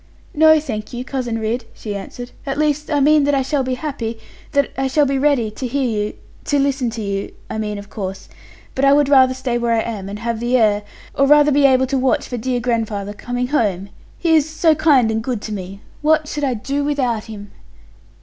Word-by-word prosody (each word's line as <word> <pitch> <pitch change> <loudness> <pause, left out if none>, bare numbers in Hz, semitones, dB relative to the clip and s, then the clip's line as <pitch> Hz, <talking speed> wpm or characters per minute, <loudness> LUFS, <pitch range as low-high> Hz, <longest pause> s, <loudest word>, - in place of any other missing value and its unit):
'No, 315 +1 +6
thank 225 -8 -6
you, 245 +1 -5
Cousin 250 -4 -3
Ridd,' 225 +2 -2
she 210 -2 -6
answered; 245 +5 -7 0.2
'at 275 - -2
least 300 0 0
I 295 -2 +1
mean 300 +1 +5
that 290 0 +2
I 270 - +1
shall 280 +1 0
be 255 0 -1
happy 250 -5 -4 0.4
that 280 -1 +2
I 270 0 0
shall 290 +2 +3
be 275 0 0
ready 270 -6 +2
to 255 +4 -5
hear 275 +3 -1
you 210 -2 -2 0.3
to 290 - +1
listen 275 -3 +1
to 225 -1 -5
you, 200 -1 -3 0.2
I 220 - -3
mean 210 -1 -3
of 205 +1 -10
course. 195 -3 -6 0.5
But 265 - -2
I 275 0 +6
would 285 -1 +3
rather 260 -2 +5
stay 255 -2 -2
where 235 -1 +1
I 225 - +2
am, 205 -4 -5
and 205 - -5
have 230 +1 -3
the 240 +2 +1
air 210 -3 +3 0.3
or 275 - +2
rather 295 +1 +6
be 280 0 +5
able 260 -1 +3
to 265 0 -1
watch 260 0 +1
for 245 - -4
dear 250 +2 -1
grandfather 220 -4 -2
coming 245 +3 -3
home. 200 -9 0 0.3
He 330 -2 +2
is 310 -1 +2
so 315 0 +3
kind 285 -7 +3
and 220 0 -2
good 245 -2 -2
to 215 - -5
me. 195 0 -7 0.2
What 310 0 +2
should 295 0 -4
I 260 -3 +1
do 275 +6 -2
without 255 -7 -1
him?' 205 -2 -9
255 Hz, 225 wpm, -19 LUFS, 220-285 Hz, 0.5 s, No